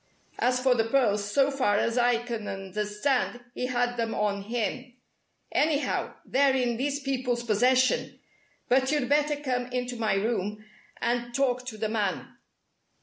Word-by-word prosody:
As 250 0 +2
for 255 0 +4
the 225 -2 +1
pearls, 210 -5 +1
so 275 +4 +3
far 255 -7 +1
as 230 +2 0
I 245 -1 +3
can 230 -3 -5
understand, 210 +7 -1
he 250 - -2
had 245 -1 0
them 230 -1 -1
on 205 -1 0
him. 245 +4 -3 0.6
Anyhow, 300 -1 0
they're 270 0 +3
in 245 -3 0
these 280 +3 -1
people's 255 -3 -1
possession. 250 +4 +2 0.5
But 265 +2 +3
you'd 295 -4 +1
better 295 +1 +3
come 255 -4 -2
into 250 -1 -3
my 220 -3 +1
room 210 0 -2 0.3
and 240 0 -1
talk 250 -2 0
to 220 -3 -6
the 215 0 -2
man." 210 -4 -2
245 Hz, 150 wpm, -27 LUFS, 220-260 Hz, 0.6 s, for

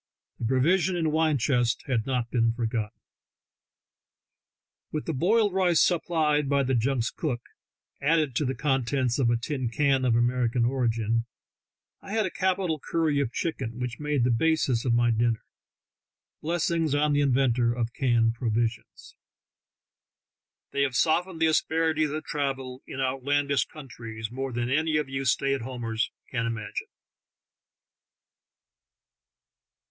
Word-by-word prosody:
The - - -3
provision 170 +8 +2
and 160 -3 0
wine 155 -1 +2
chcvsts 120 -2 +1
had 120 -4 -1
not 125 -3 -1
been 115 -2 +2
forgotten. 115 -2 -3 1.9
With 155 - -3
the 165 - -2
boiled 205 - +2
rice 180 -3 +3
supplied 155 -4 +2
by 140 -1 +3
the 130 0 0
junk's 120 0 +1
cook, 130 -7 -3 0.6
added 150 -3 +2
to 150 - +1
the 130 +1 -1
contents 130 -1 0
of 125 -3 +3
a 120 - +2
tin 130 0 -3
can 135 +1 +2
of 120 -3 +3
American 120 0 +2
origin, 115 -2 0 0.7
I 200 - -8
had 220 -2 +2
a 185 - -3
capital 185 -4 0
curry 155 -1 0
of 140 -5 -1
chicken, 120 -7 -3
which 125 -1 -4
made 150 -4 0
the 125 - +2
basis 135 -2 +1
of 120 - +2
my 120 0 +3
dinner. 115 0 +1 1.0
Blessings 165 -2 0
on 150 0 +2
the 145 - +3
inventor 125 -3 +2
of 120 -1 -2
canned 115 -4 +2
provisions! 115 -1 -3 1.6
They 140 - -1
have 135 -3 0
softened 165 +8 +1
the 160 - +4
asper 160 +1 +2
ities 155 -2 0
of 155 - -6
travel 135 -3 -3
in 135 - -7
outlandish 135 +1 +1
countries 115 -6 -8
more 135 +1 -4
than 120 0 -2
any 155 +2 +2
of 150 -2 -1
you 135 0 -3
stay 135 +2 +2
at 135 - -2
homers 115 -2 -3 0.2
can 115 -3 -1
imagine. 110 -3 -4
135 Hz, 140 wpm, -27 LUFS, 120-155 Hz, 1.9 s, the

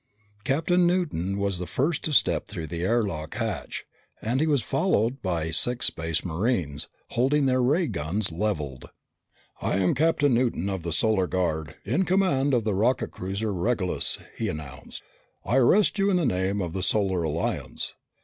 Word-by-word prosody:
Captain 175 +7 +2
Newton 150 - 0
was 100 -3 -1
the 90 - -4
first 150 +4 0
to 155 - -1
step 145 - +3
through 80 - -5
the 85 +2 -5
air 115 +5 +2
lock 80 -6 -5
hatch - - -3 0.3
and 120 +4 -1
he 160 - +2
was 145 -6 +2
followed 135 - +1
by 85 -4 -1
six 120 +10 +1
Space 80 0 -1
Marines, 85 - -1 0.2
holding 135 +4 +2
their 130 -1 +3
ray 150 +8 +3
guns 95 - -2
leveled. 80 -8 -3 0.7
"I - - 0
am 95 -2 +2
Captain 145 -2 +2
Newton 115 -6 +1
of 95 -2 -3
the 85 +1 -4
Solar 95 +1 +2
Guard, 80 -5 -1
in 140 - +1
command 175 -8 +2
of 120 - +1
the 105 -1 0
rocket 115 +7 +1
cruiser 100 +3 -3
Regulus," 95 0 0 0.2
he - - -2
announced. 75 -3 -7 0.4
"I 125 - +2
arrest 195 - +4
you 195 +1 +3
in 190 - +3
the 170 - +1
name 95 -2 0
of 85 -2 -4
the 95 - -2
Solar 95 -2 +1
Alliance." 80 0 -2
105 Hz, 170 wpm, -26 LUFS, 85-135 Hz, 0.7 s, arrest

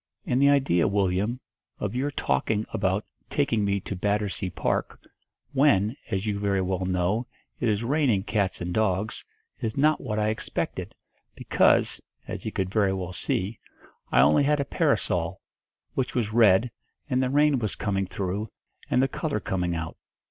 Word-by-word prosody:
And 125 +2 +1
the 140 - +6
idea, 135 -12 +3
Willyum, 100 +4 0 0.4
of - - -3
your 130 +4 0
talking 105 - 0
about 95 +1 0 0.2
taking 120 -7 +1
me 100 0 +1
to 100 - -5
Battersea 100 0 -1
Park, - - -2 0.5
when, 120 -6 +3
as 95 -2 -1
you 105 -2 -1
very 100 -1 +1
well 95 0 -1
know, 95 +6 0 0.3
it 120 - +1
is 105 +1 0
raining 125 -6 +2
cats 100 -4 -1
and 90 0 -3
dogs, 105 0 0 0.4
is 110 +2 -3
not 150 +2 +3
what 110 -5 -3
I 105 0 +2
expected' 110 0 -3 0.4
because, - - +3 0.3
as - - -5
he - - -3
could 95 -1 -2
very 100 -2 +2
well 90 -1 -4
see, 95 +4 -2 0.5
I 65 - +6
only 75 - +5
had 145 +1 +2
a 140 - 0
parasol, - - 0 0.5
which 130 -1 -2
was 110 -4 0
red, 115 0 +5 0.4
and 130 -3 +1
the 130 - +1
rain 145 0 +3
was 110 -4 -2
coming 95 -2 -1
through, 100 +3 -3 0.4
and 125 - +3
the - - +3
colour 145 -3 -2
coming 90 -3 -1
out. 80 -1 -5
105 Hz, 165 wpm, -26 LUFS, 95-125 Hz, 0.5 s, the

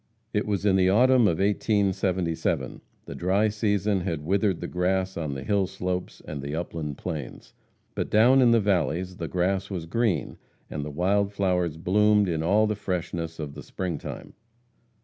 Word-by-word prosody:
It - - 0
was 100 -1 -1
in 95 -2 +4
the 95 0 +4
autumn 125 +3 +5
of 85 - +1
1877. 95 -4 0 0.2
The - - -7
dry 100 +4 +1
season 105 -2 0
had 80 -5 -3
withered 95 0 +1
the - - -4
grass 95 +1 0
on 75 -4 -3
the 65 - -5
hill 100 -3 +1
slopes 90 -1 -4
and 75 -3 -5
the 70 +2 -4
upland 80 -3 -4
plains. 75 -8 -6 0.4
But - - -3
down 125 +5 +5
in 125 - +6
the 115 0 +5
valleys 90 -2 0
the 85 - -4
grass 95 +2 -1
was 90 -5 -4
green, 110 +1 -1 0.3
and 75 - -3
the 75 - -5
wild 100 +6 +1
flowers 90 -5 0
bloomed 105 +4 +3
in 80 -3 -1
all 105 +6 +3
the 105 - 0
freshness 85 -4 -4
of 75 -3 -6
the 75 - -9
spring 90 -3 -4
time. - - -8
95 Hz, 175 wpm, -26 LUFS, 85-105 Hz, 0.4 s, in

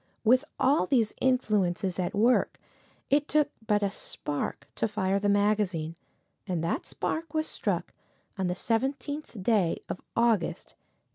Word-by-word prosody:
With 255 +4 +5 0.2
all 265 -8 +3
these 230 -3 +2
influences 200 -8 +1
at 180 +1 -1
work, 235 +5 +3 0.5
it 290 +1 +3
took 300 -1 +2 0.2
but 205 -1 +3
a 200 - +1
spark 145 -6 -4
to 225 - 0
fire 200 -2 0
the 205 0 +1
magazine, 200 -6 +1 0.5
and 175 -4 -1
that 260 - -1
spark 320 -1 -3
was 310 0 +2
struck - - -2 0.4
on 190 -3 -1
the 180 - -1
seventeenth 265 +1 -2
day 200 -6 +2
of - - -5 0.2
August, 230 -6 +1
1862. - - -23
210 Hz, 145 wpm, -28 LUFS, 185-255 Hz, 0.5 s, With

